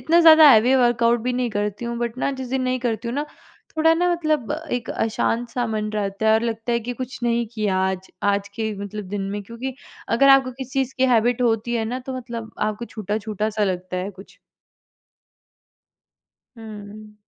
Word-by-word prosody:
इतना 335 +2 +4
ज़्यादा 320 -2 +9
heavy 240 +2 +5
workout 240 -1 +3
भी 250 +2 -1
नहीं 245 -1 -1
करती 210 +1 -3
हूँ 235 0 -3
बट 235 0 -3
ना 275 - 0
जिस 260 - -5
दिन 265 +1 -1
नहीं 255 0 0
करती 235 -1 -2
हूँ 235 - -3
ना, 290 +1 -2 0.5
थोड़ा 320 +1 +5
ना 355 +2 +2
मतलब 310 -7 0 0.2
एक 245 -1 -2
अशांत-सा 235 +2 -1
मन 215 -1 -2
रहता 205 0 -2
है - - +6
और 220 - +2
लगता 230 0 -2
है 235 - +1
कि 240 +2 -4
कुछ 255 0 -7
नहीं 235 -1 +1
किया 210 -4 0
आज, 190 0 -2
आज 200 0 +1
के 220 -1 -2
मतलब 210 +1 -6
दिन 200 0 -3
में 205 +1 -4
क्योंकि 235 +5 -6 0.4
अगर 275 +3 +5
आपको 270 -1 +5
किसी 260 0 -8
चीज़ 265 - -14
की 260 - +4
हैबिट 245 0 +2
होती 230 0 +1
है 225 -1 0
ना, 245 +3 -3
तो 260 0 -6
मतलब 235 -3 -6
आपको 215 +2 -2
छूटा-छूटा 215 -1 -3
सा 215 0 0
लगता 185 -1 -3
है 185 +2 -3
कुछ। 195 0 -15 2.2
हुँ। 215 -1 -10
230 Hz, 195 wpm, -22 LUFS, 215-250 Hz, 2.2 s, ज़्यादा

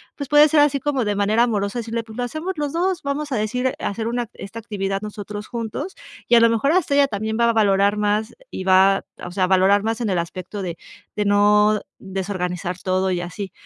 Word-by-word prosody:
pues 285 -2 -6
puede 295 +1 +7
ser 300 0 +4
así 285 -1 +3
como 275 -3 -1
de 205 -1 0
manera 210 +3 +3
amorosa 210 -1 -1
decirle: 230 0 -3
"Pues 220 0 -12
lo 245 - -1
hacemos 315 +9 -4
los 290 -1 -2
2". 365 +1 0
Vamos 285 +1 -3
a - - +1
decir 250 +5 -1
hacer 220 -1 -3
una 240 -1 -2
esta 220 +4 -8
actividad 195 -3 -3
nosotros 210 0 -7
juntos 235 - -5 0.3
y 240 - +6
a - - +8
lo 230 0 +5
mejor 230 +6 +1
hasta 360 -6 +1
ella 285 -1 +5
también 220 +1 -3
va 235 0 +4
a - - +2
valorar 200 -1 +3
más 210 +2 0 0.2
y - - -5
va, 190 +1 +4 0.2
o 180 - -7
sea, 185 +1 -1
a - - -2
valorar 195 +2 +4
más 225 +1 -1
en 225 - -1
el 180 - 0
aspecto 185 +4 -5
de 175 -2 -5 0.4
de 210 - 0
no 210 +1 +4 0.2
desorganizar 185 -2 -4
todo 185 0 0
y 180 - -1
así, 185 +2 -6
210 Hz, 225 wpm, -21 LUFS, 195-245 Hz, 0.4 s, a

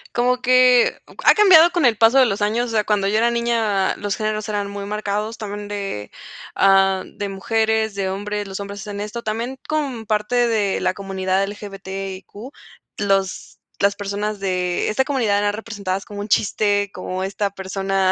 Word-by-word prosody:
Como 250 +1 +1
que 255 -1 +4
o - - -17
ca - - +2
ha - - +9
cambiado 360 -5 +7
con 345 -5 +1
el 230 -3 +3
paso 230 +5 +5
de 260 - +7
los 205 -3 -2
años. 225 +4 +1
O 230 - -6
sea, 215 -1 +2
cuando 205 -2 +1
yo 210 +2 +1
era 235 +2 +3
niña, 230 -5 +1
los 205 -1 -3
géneros 215 -1 -2
eran 205 -1 -2
muy 200 0 -6
marcados 210 +1 -3
también 205 -1 -6
de, 195 - -5 0.4
ah, 195 -1 +4
de 205 -1 -6
mujeres, 220 +2 0
de 195 -1 -1
hombres, 205 +2 -3
los 195 0 -6
hombres 200 0 -6
hacen 200 0 -6
esto 210 +3 -5
también 230 +5 -3
como 280 -7 -2
parte 210 +2 -1
de 205 -4 0
la 185 - +1
comunidad 190 -1 -1
LGBTIQ, 195 -2 -7 0.7
los 195 -2 -1 0.2
las 200 0 +2
personas 205 +1 -3
de 180 -2 -1
esta 215 +5 +2
comunidad 230 -8 +1
eran 205 0 0
representadas 205 -3 -4
como 205 -1 -8
un 205 - -4
chiste, 205 -1 +1
como 185 0 -4
esta 200 +1 -2
persona, 195 0 -1
205 Hz, 180 wpm, -21 LUFS, 195-225 Hz, 0.7 s, ha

